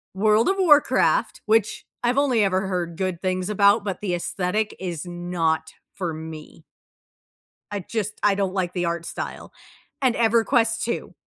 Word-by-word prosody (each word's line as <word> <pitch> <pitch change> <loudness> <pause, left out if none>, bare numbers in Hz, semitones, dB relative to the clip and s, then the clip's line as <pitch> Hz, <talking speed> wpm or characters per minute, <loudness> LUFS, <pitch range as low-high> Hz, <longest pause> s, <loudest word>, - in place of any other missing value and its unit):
World 215 - +3
of 390 - +2
Warcraft, 360 +8 +3
which 215 -1 +1 0.2
I've 245 +3 +1
only 255 -7 +3
ever 190 0 +1
heard 175 -3 -3
good 185 -3 -2
things 185 0 -1
about, 200 +1 +4
but 195 -1 -4
the 180 -4 -1
aesthetic 195 +4 -2
is 175 -3 -4
not 170 -2 -2 0.2
for 175 -4 -3
me. 160 0 -9 1.1
I 205 - -2
just 210 +2 -4
I 205 -1 +4
don't 195 -2 -1
like 180 -2 -1
the 175 -2 -1
art 170 0 -2
style - - -6 0.5
And 255 -3 +2
EverQuest 230 0 +2
II. 235 - -3
195 Hz, 155 wpm, -23 LUFS, 175-225 Hz, 1.1 s, about